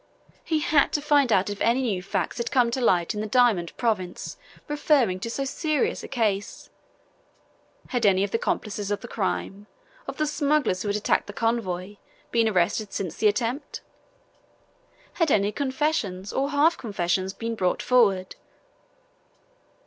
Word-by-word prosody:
He 315 -2 0
had 295 -1 +3
to - - +2
find 290 -4 +3
out 190 -2 +3
if 205 - -7
any 240 +3 +2
new 200 -7 -1
facts 195 +5 -3
had 235 - -2
come 245 -3 +3
to 260 - -2
light 180 -5 +2
in 210 - -3
the 215 - -3
diamond 215 -7 +2
province 205 -7 -2 0.3
referring 285 -10 +2
to 230 - -4
so 275 +4 -2
serious 300 +1 -1
a - - -8
case. 215 -5 -2 1.2
Had 245 -2 -1
any 190 -1 +4
of 200 - -2
the 230 - 0
accomplices 205 -3 -2
of 205 - -2
the 240 - -8
crime, 200 -1 -3 0.4
of - - -6
the 305 - +1
smugglers 290 - +1
who 205 - -2
had 205 - 0
attacked 210 - +1
the 205 - -7
convoy, 205 -4 -2 0.3
been 230 -1 +3
arrested 195 +2 0
since 180 -5 -3
the 215 - +3
attempt? 240 +7 -2 1.4
Had 325 - +4
any 205 -4 +2
confessions 260 - -2
or 275 +1 0
half 300 +4 +3
confessions 190 -3 -1
been 230 +3 -4
brought 185 -5 -1
forward? 200 -7 +2
225 Hz, 160 wpm, -25 LUFS, 195-265 Hz, 1.4 s, any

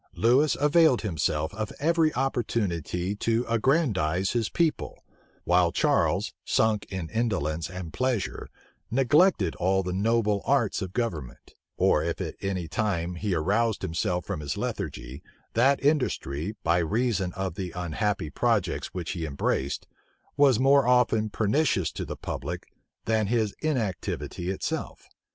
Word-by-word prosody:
Lewis 130 +6 +3
availed 150 -2 +4
him 100 -6 -3
self 75 +3 0
of 110 0 -4
every 160 +1 +3
opportunity 105 - -1
to 115 +3 0
aggrandize 105 - +1
his 115 -3 0
people, 165 -3 -1 0.4
while 90 -1 +3
Charles, - - +1
sunk 110 -2 +1
in 95 -4 -4
indolence 90 -9 -1
and 90 -3 -7
pleasure, 130 -6 -1 0.4
neglected 135 - +3
all 95 +2 +1
the 90 0 -3
noble 105 0 +1
arts 120 -7 +1
of 95 -1 -5
government; 85 - -4 0.2
or - - +3
if - - -2
at - - -3
any 95 -3 -2
time 90 -2 -1
he 95 +2 -2
roused 105 +7 +1
himself 90 0 -1
from - - -3
his 70 -2 -4
lethargy, 65 +4 -4 0.3
that 135 +4 +4
industry, 105 - 0
by 85 +2 +3
reason 100 +1 0
of 95 -2 -3
the 95 0 -4
unhappy 90 -1 -2
projects 105 - 0
which 85 -4 -3
he 85 - -4
embraced, 70 -1 -1 0.5
was 140 -5 +5
often 125 -4 +4
more - - -4
pernicious 105 - +1
to - - -5
the - - -6
public 85 +5 -5 0.4
than 110 -2 +1
his 110 -2 +1
inactivity 110 - -2
itself. 95 - -4
105 Hz, 135 wpm, -27 LUFS, 90-120 Hz, 0.5 s, was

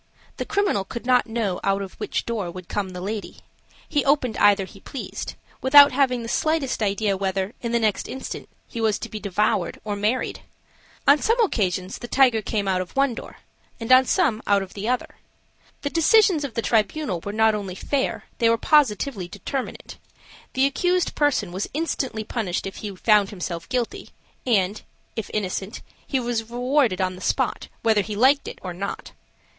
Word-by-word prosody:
The - - -3
criminal 400 - +1
could 235 +5 -7
not 250 -1 +3
know 225 -5 -1
out 195 0 +1
of 190 - -8
which - - -2
door 215 -6 -2
would 180 0 -9
come 200 -2 -2
the 180 -1 -7
lady; 205 +2 -5 0.5
he 290 -4 +1
opened 275 -5 +2
either 200 -1 +4
he 195 +1 -14
pleased, 265 - -6 0.3
without 285 +2 +8
having 255 -3 +1
the - - -5
slightest 305 -1 0
idea 200 0 +1
whether, 190 +1 -2
in 235 - -3
the 235 - +3
next 220 -3 0
instant, 265 - -6 0.2
he 230 - -5
was 220 -2 +2
to - - -7
be 215 - -6
devoured 205 +1 0
or 210 -1 -3
married. 210 +5 -1 0.7
On 285 +1 +7
some 455 +2 +2
occasions 185 - -2
the 240 - -7
tiger 245 -4 +4
came 205 -1 -2
out 185 -1 +1
of 185 - -8
one 275 -2 +3
door, - - -9 0.4
and 230 +2 -3
on 255 +1 +8
some 260 - +1
out 200 -1 +3
of 190 - -11
the 210 +3 -3
other. 250 0 -2 0.7
The 285 - -2
decisions 345 -1 +4
of 275 -5 -5
this 230 - -1
tribunal 220 - +1
were 200 - -4
not 220 +1 +3
only 200 -3 -4
fair, 275 +6 -1 0.2
they 230 -2 +4
were 230 - +3
positively 250 - +2
determinate: 265 +8 -6 0.5
the 260 +1 +3
accused 355 +6 +1
person 290 -11 +1
was 190 +3 -3
instantly 270 -8 -2
punished 210 -6 -3
if 195 - -6
he 205 -2 -6
found 210 0 +4
himself 175 -3 -5
guilty, 245 -2 -2 0.4
and, 205 -3 +2 0.3
if 225 - -4
innocent, 195 0 -3 0.2
he 270 - 0
was 235 -2 -2
rewarded 245 -3 +1
on 185 0 0
the 180 - -11
spot, - - -1 0.2
whether 220 -2 +4
he 210 +1 -5
liked 265 +6 +4
it - - -7
or 180 -2 -4
not. 195 +3 -5
225 Hz, 185 wpm, -24 LUFS, 195-260 Hz, 0.7 s, without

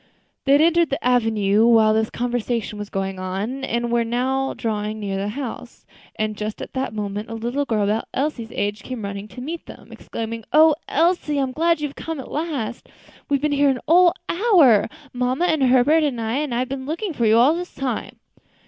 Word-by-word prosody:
They 275 - +4
had 285 - +6
entered 340 -1 +3
the 275 -3 -2
avenue 220 -3 +3
while 220 -2 +5
this 220 0 +1
conversation 235 -3 -2
was 205 0 -6
going 195 -1 -3
on, 200 +9 -4
and 235 -2 -1
were 235 0 +2
now 260 +3 -1
drawing 215 -1 -3
near 200 -2 -3
the 195 +1 -2
house; 245 +3 -7 0.3
and 215 0 -2
just 210 +1 -5
at - - -8
this 260 0 -1
moment 210 0 -4
a 225 - -5
little 240 +6 -2
girl 220 -5 0
about 210 +3 0
Elsie's 265 -5 -2
age 205 +2 -2
came 255 -4 -6
running 200 +1 -6
to 215 +5 -10
meet 325 +6 -6
them, - - -12
exclaiming, 230 0 -6
"O 315 0 +7
Elsie! 325 -1 +1
I'm 270 -2 0
glad 330 +3 +1
you've 295 -2 -3
come 325 -1 -6
at 265 - -9
last. 290 -8 -4 0.4
We've 280 -1 +2
been 300 0 0
here 285 0 +3
a 260 -2 0
whole 350 +2 +6
hour 335 - +4 0.3
mamma, 255 +6 0
and 315 -4 +1
Herbert, 260 +5 +4
and 275 -5 -1
I 225 +2 -1
and 290 -4 -2
I've 250 +2 -1
been 265 0 -5
looking 340 +4 -3
for 235 -5 +1
you 220 +1 +5
all 255 +6 +5
this 355 +1 -6
time." 255 -5 -3
245 Hz, 200 wpm, -22 LUFS, 220-290 Hz, 0.4 s, O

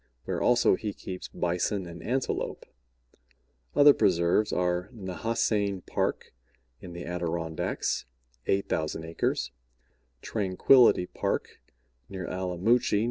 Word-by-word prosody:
where - - -2
also 120 0 +4
he 105 +2 -2
keeps 90 -1 -7
Bison 90 +3 -1
and 85 0 -9
Antelope. 130 +2 -2 1.1
Other 145 0 +8
preserves 85 +3 +2
are 90 +1 0
Nehasane 100 -1 -1
Park, - - -2 0.5
in 90 - -9
the 85 0 -7
Adirondacks, 85 -2 -2 0.4
8,000 80 -5 -1
acres; 80 0 -1 0.7
Tranquillity 105 +1 +4
Park, - - -3 0.5
near 95 -2 -5
Allamuchy, 95 +6 +1
N. - - +2
95 Hz, 100 wpm, -28 LUFS, 85-110 Hz, 1.1 s, Other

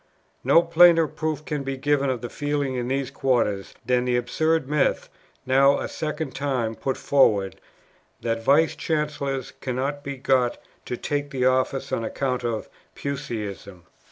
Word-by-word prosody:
No 165 - +5
plainer 170 0 +6
proof 155 -1 -3
can 150 -2 -2
be 135 0 -4
given 140 0 +1
of 125 -3 -2
the 120 - -5
feeling 145 -2 -1
in 125 -1 -2
these 135 0 -1
quarters, 120 -8 0
than 125 0 +2
the 125 -1 +2
absurd 155 +5 0
myth, 150 0 +1 0.4
now 135 +2 +5
a - - -3
second 155 -2 -4
time 130 -5 -1
put 130 +3 -3
forward, 105 -9 +2 0.6
'that 115 -1 -2
Vice 155 +5 +4
Chancellors 145 -4 -2
cannot 135 +3 -2
be 140 -1 -5
got 130 -2 +1 0.3
to 125 - -3
take 145 +2 -2
the 130 -3 -1
office 130 +1 +1
on 115 - -1
account 125 +2 -2
of 115 -2 -2 0.3
Puseyism.' 110 - -5
135 Hz, 155 wpm, -24 LUFS, 125-145 Hz, 0.6 s, plainer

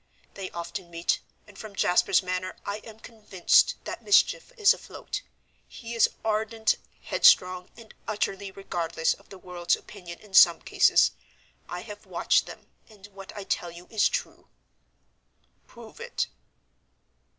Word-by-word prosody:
They 195 -2 -6
often 170 +2 -6
meet, 170 0 0 0.3
and 205 -2 -16
from 215 -2 -9
Jasper's 185 0 +3
manner 185 0 -3
I 200 +1 -3
am 220 0 -13
convinced 210 -5 +2
that - - -6
mischief 455 +4 +3
is 420 -3 +6
afloat. - - -7 0.5
He 235 0 -9
is 230 - +4 0.2
ardent, 220 +1 +1 0.3
headstrong, 180 0 +4
and 230 -2 -14
utterly 200 -1 -2
regardless 170 -4 -1
of - - -19
the 195 - -11
world's 175 -2 -1
opinion 175 -4 -11
in 210 -2 -19
some 170 -3 +8
cases. - - +4 0.6
I - - -5
have - - -11
watched - - +2
them, - - -11 0.2
and 205 -3 -15
what 195 0 -10
I 205 - -5
tell 175 -2 -2
you 170 +1 -12
is 220 -2 +3
true." - - -5 1.2
"Prove 235 - -14
it." 475 +1 -2
195 Hz, 140 wpm, -27 LUFS, 180-220 Hz, 1.2 s, some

